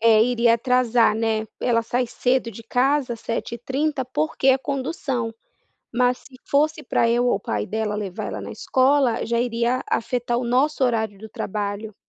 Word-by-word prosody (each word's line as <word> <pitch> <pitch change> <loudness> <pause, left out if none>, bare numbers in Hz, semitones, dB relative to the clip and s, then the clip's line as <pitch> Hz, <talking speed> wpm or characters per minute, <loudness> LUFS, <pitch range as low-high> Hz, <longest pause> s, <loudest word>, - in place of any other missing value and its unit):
eh, 220 -1 +6
iria 235 -1 +3
atrasar, 240 -2 +3
né. 220 0 0
Ela 230 -2 +2
sai 245 +2 -1
cedo 250 0 0
de 230 +1 -10
casa, 255 +1 +1
07:30, 260 +5 -2
porque 265 +2 -2
é 265 - +6
condução, 265 -4 -3 0.6
mas 250 0 +2
se 265 - -17
fosse 305 +3 +2
para 235 -2 +1
eu 240 +1 +2
ou - - +3
o - - -3
pai 105 - -2
dela 220 -1 -2
levar 200 -4 -4
ela - - -5
na - - -7
escola, 265 -2 +2
já 235 0 0
iria 240 +1 0
afetar 240 0 -1
o 250 - -1
nosso 265 +4 +2
horário 220 -5 0
do 220 +1 -10
trabalho. 205 +1 -4
240 Hz, 170 wpm, -23 LUFS, 225-255 Hz, 0.6 s, eh